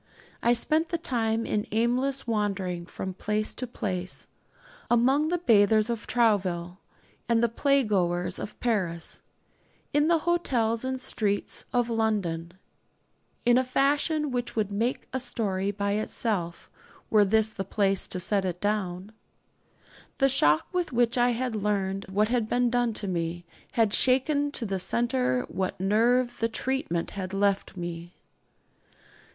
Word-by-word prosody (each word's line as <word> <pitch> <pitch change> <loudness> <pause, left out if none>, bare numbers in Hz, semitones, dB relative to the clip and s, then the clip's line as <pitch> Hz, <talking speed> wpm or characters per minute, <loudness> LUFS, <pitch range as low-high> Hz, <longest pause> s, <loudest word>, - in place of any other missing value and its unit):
I 235 - +4
spent 310 +7 +1
the 340 - -1
time 230 -7 -1
in 210 0 -1
aimless 250 +5 0
wandering 195 -6 -2
from 190 0 -5
place 210 +3 -2
to 255 - -5
place 185 -6 -4 0.6
among 265 +6 +3
the 350 +2 0
bathers 215 - +4
of 230 -3 -5
Trouville 190 -6 +1 0.5
and 230 0 +3
the - - +5
playgoers 210 -9 +1
of 210 - -7
Paris, 185 -9 -2 0.7
in 295 +1 +3
the 335 0 +4
hotels 260 -10 0
and 260 0 -2
streets 205 -5 -1
of 240 -1 +1
London 195 -7 -1 0.9
in 240 +1 +5
a - - +1
fashion 290 +3 +1
which 245 -1 -2
would 210 -2 -1
make 230 +5 -1
a 260 - 0
story 200 -6 -1
by 200 0 -2
itself, 205 -4 -2 0.4
were 215 -1 +6
this 220 +2 +3
the 195 - -4
place 195 0 0
to 185 - -4
set 195 +2 +2
it 180 -2 -3
down. 200 -2 -2 1.1
The 270 -1 +3
shock 155 - +3
with 360 -1 -1
which 240 -1 +2
I 245 0 +3
had 245 0 -1
learned 195 -2 -1
what 210 +3 +1
had 235 -3 0
been 245 -1 +2
done 245 -2 +1
to 205 - -3
me 170 -1 -3 0.3
had 225 -3 +2
shaken 285 +3 +3
to 235 - 0
the 195 -2 -2
centre 130 - +1
what 190 -2 -3
nerve 240 +5 +2
the 230 - +1
'treatment' 225 -8 -1
had 190 -1 -5
left 200 -1 0
me. 175 0 -6
215 Hz, 145 wpm, -27 LUFS, 190-245 Hz, 1.1 s, were